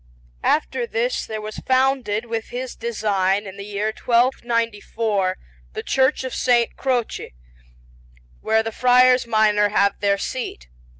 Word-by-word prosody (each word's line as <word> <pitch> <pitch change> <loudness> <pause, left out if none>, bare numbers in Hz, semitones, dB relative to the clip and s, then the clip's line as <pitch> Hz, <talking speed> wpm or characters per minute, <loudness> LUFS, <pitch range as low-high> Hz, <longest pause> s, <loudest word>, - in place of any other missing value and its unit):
After 470 +9 0
this 485 +1 -1
there 215 -1 -5
was 215 0 -7
founded 255 -4 +1
with 225 -1 -3
his 250 +1 -6
design, 205 -3 0
in 190 -1 -8
the 200 - -8
year 210 +1 -2
1294, 230 -5 0 0.4
the - - -5
Church 265 +1 +1
of 260 - -4
S. 240 -2 +2
Croce, 245 - -2 1.1
where 220 0 +2
the 225 - -4
Friars 250 +1 +4
Minor 210 -2 +3
have 200 -1 +2
their 200 0 +2
seat. 195 - -5
225 Hz, 130 wpm, -22 LUFS, 205-255 Hz, 1.1 s, Friars